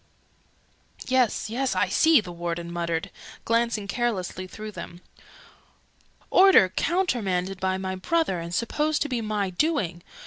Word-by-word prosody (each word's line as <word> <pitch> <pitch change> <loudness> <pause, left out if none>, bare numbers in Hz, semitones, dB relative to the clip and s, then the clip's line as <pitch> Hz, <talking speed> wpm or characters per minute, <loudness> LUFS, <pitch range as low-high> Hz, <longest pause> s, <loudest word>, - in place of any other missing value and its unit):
"Yes, 255 -5 +1
yes, 250 +1 -1
I 185 +2 +2
see!" 320 -5 +5
the 180 -4 -9
Warden 170 0 -4
muttered, 170 -1 -2 0.3
glancing 230 -3 0
carelessly 195 -5 -2
through 215 +3 -8
them. 175 -3 -9 1.3
"Order 370 - +7
countermanded 195 - -1
by 190 0 0
my 190 0 -3
brother, 195 - 0
and 170 0 -6
supposed 295 - 0
to 295 - -5
be 245 -3 -1
my 210 -3 -2
doing! 180 - 0
205 Hz, 130 wpm, -25 LUFS, 180-255 Hz, 1.3 s, Order